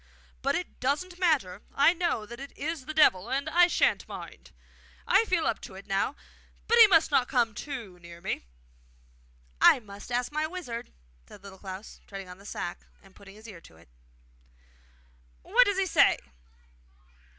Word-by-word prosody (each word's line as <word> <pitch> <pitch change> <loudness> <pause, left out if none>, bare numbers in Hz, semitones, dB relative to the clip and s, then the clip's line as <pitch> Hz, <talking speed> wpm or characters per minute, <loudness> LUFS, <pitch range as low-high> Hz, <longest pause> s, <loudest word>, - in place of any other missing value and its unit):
But - - 0
it 360 - -5
doesn't 330 +8 -2
matter. 280 - +1
I 285 +5 +5
know 340 -11 -1
that 235 +3 -10
it 275 +1 -10
is 300 -2 -4
the 310 - -4
Devil, 210 -9 +4
and 275 +1 -1
I 350 +1 +5
sha'n't - - +1
mind! - - -10 0.6
I 455 - +4
feel 355 -6 0
up - - -1
to 190 - -10
it 195 - -11
now. 195 +8 -1 0.5
But 470 +1 +4
he 450 - +11
must 325 -5 +4
not 255 -3 +3
come 240 -4 +1
too 225 -8 -7
near 170 0 -12
me!' - - -4 1.2
'I - - +7
must 205 +2 -12
ask 245 +2 -1
my 305 +1 -1
wizard,' 275 -10 -7 0.4
said 200 - -15
Little 195 -1 -12
Klaus, 190 +1 -9
treading 195 -2 -8
on 180 +1 -11
the 200 - -13
sack 175 - -6 0.2
and 195 -1 -20
putting 195 0 -15
his 215 +2 -14
ear 190 -6 -11
to 80 - -18
it. 85 -4 -21 1.5
'What 480 +7 +5
does 405 -1 0
he 390 - +2
say? 370 - +4
245 Hz, 175 wpm, -28 LUFS, 195-330 Hz, 1.5 s, he